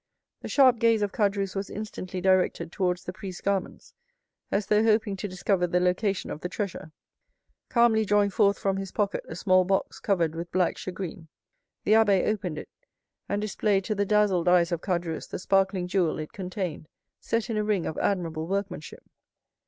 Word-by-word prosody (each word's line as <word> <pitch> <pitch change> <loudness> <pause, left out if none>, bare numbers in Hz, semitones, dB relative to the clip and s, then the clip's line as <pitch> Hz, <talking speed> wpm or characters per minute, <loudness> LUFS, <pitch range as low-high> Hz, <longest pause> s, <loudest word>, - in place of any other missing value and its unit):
The - - -6
sharp 255 -4 +5
gaze 230 -2 +3
of 205 - -1
Caderousse 200 -2 0
was 195 0 -3
instantly 190 -3 -6
directed 185 -2 +2
towards 180 -2 -1
the 180 - -6
priest's 185 -1 -7
garments, 195 -2 -3 0.6
as 200 0 +1
though 210 0 +3
hoping 215 -2 +2
to 205 - -4
discover 185 -1 0
the 180 +1 +1
location 180 +2 0
of 150 - -6
the 180 - -4
treasure. 195 -5 -5 0.8
Calmly 235 -2 +4
drawing 205 -1 +2
forth 200 0 +3
from 195 -1 -1
his 195 -1 -5
pocket 205 -1 -1
a 160 - -6
small 185 0 +3
box 195 +1 -1
covered 180 -9 +1
with 170 +1 -6
black 180 -1 +1
shagreen, 180 -3 -6 0.6
the - - 0
abbé 210 -4 +5
opened 190 -7 -2
it, - - -7 0.6
and 205 +1 -1
displayed 205 -1 +1
to 215 - -1
the 200 -1 0
dazzled 205 -4 +2
eyes 175 -1 +4
of 170 -1 -1
Caderousse 170 -3 -3
the - - -4
sparkling 190 -1 +1
jewel 180 -3 +1
it 155 -1 -6
contained, 180 -5 -5 0.3
set 230 0 -1
in - - -1
a 210 - +1
ring 210 -4 0
of 160 - -3
admirable 165 -5 -1
workmanship. 195 -4 -4
195 Hz, 180 wpm, -27 LUFS, 180-205 Hz, 0.8 s, sharp